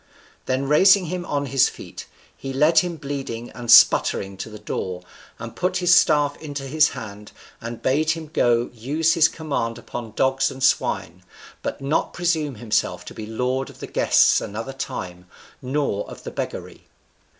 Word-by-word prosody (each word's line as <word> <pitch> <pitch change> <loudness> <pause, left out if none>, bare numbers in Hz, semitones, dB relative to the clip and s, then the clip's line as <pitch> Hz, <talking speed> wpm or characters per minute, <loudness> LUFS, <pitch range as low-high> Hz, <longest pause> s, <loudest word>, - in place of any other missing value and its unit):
Then 130 +1 -1
raising 190 +6 +5
him 180 -1 -4
on 145 -1 -1
his 135 -1 +3
feet, - - -10 0.3
he 135 0 -7
led 150 +5 +4
him 175 -2 -2
bleeding 135 -6 -6
and 120 -1 -9
sputtering 100 -4 +5
to 95 - -6
the 105 - -10
door, 90 -3 -5 0.3
and 115 0 -8
put 180 +1 -1
his 175 -1 +4
staff 145 -4 +4
into 145 -3 -6
his 155 +4 +3
hand, 105 -1 -9 0.3
and 115 0 -7
bade 150 +4 +1
him 160 -1 -2
go 120 0 +2
use 150 +8 0
his 165 -2 +5
command 140 -8 -3
upon 115 -1 -8
dogs 135 0 +2
and 130 0 -7
swine, 90 -8 0 0.4
but - - -5
not 140 +3 -1
presume 160 -5 -1
himself 110 0 -1
to - - -9
be 110 - -8
lord 125 +4 -2
of - - -15
the - - -6
guests - - +3
another 115 +6 -6
time, 90 -8 -6 0.3
nor 130 -6 -2
of - - -11
the - - -6
beggary! - - -6
135 Hz, 170 wpm, -22 LUFS, 115-155 Hz, 0.4 s, raising